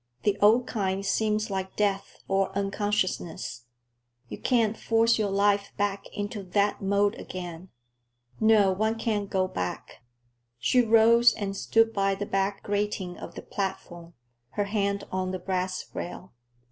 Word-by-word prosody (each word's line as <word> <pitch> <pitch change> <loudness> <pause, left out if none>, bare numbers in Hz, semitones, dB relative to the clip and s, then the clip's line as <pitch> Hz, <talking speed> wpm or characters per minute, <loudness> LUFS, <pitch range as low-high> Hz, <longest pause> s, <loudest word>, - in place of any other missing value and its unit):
The 205 -2 +2
old 225 +4 +5
kind 195 -4 -2
seems 215 0 0
like 190 -1 -3
death 200 -2 -1
or 195 0 +1
unconsciousness. 195 - -2 0.6
You - - -7
can't 230 -4 +2
force 230 +1 +2
your 210 -2 +1
life 200 0 +1
back 200 -1 -1
into 205 +1 -4
that 200 +2 0
mould 200 +1 +2
again. 180 0 -7 0.7
No, 215 -3 +5
one 220 +4 0
can't 210 -3 -1
go 185 -1 +1
back." 90 - -5 0.6
She 250 - +3
rose 230 +1 +5
and 200 -2 -3
stood 225 +3 +2
by 195 -1 +1
the 205 - -4
back 195 0 -1
grating 205 -3 -2
of - - -9
the - - -7
platform, 175 -3 -5 0.4
her 205 - +2
hand 200 -1 -1
on 185 0 -1
the 185 - -2
brass 185 0 -2
rail. 180 +1 -7
200 Hz, 145 wpm, -27 LUFS, 190-215 Hz, 0.7 s, old